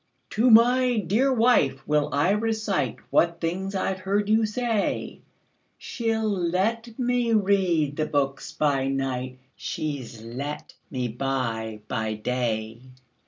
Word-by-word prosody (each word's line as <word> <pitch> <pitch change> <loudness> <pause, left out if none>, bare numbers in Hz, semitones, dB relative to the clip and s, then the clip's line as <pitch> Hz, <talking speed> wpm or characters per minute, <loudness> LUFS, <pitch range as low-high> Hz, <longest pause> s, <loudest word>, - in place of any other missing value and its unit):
"To 230 +4 +3
my 245 +2 +5
dear 215 +8 +2
wife 225 - +2
will 150 -1 +2
I 145 +7 +2
reciteWhat 200 - 0
things 190 +4 -3
I 190 0 0
've 190 - -9
heard 200 +2 0
you 220 0 +3
say; 225 -1 -2 0.6
She 230 -2 -3
'll 220 -1 0
let 210 +5 -1
me 245 -2 +1
read 185 -8 +2
the 155 -1 0
books 140 -1 -1
by 140 -3 +1
nightShe 135 +2 -4
's 115 -1 -11
let 135 +6 -6 0.2
me 125 -3 -2
buy 115 -3 -3
by 110 0 -2
day. 110 -1 -2
170 Hz, 125 wpm, -25 LUFS, 135-220 Hz, 0.6 s, my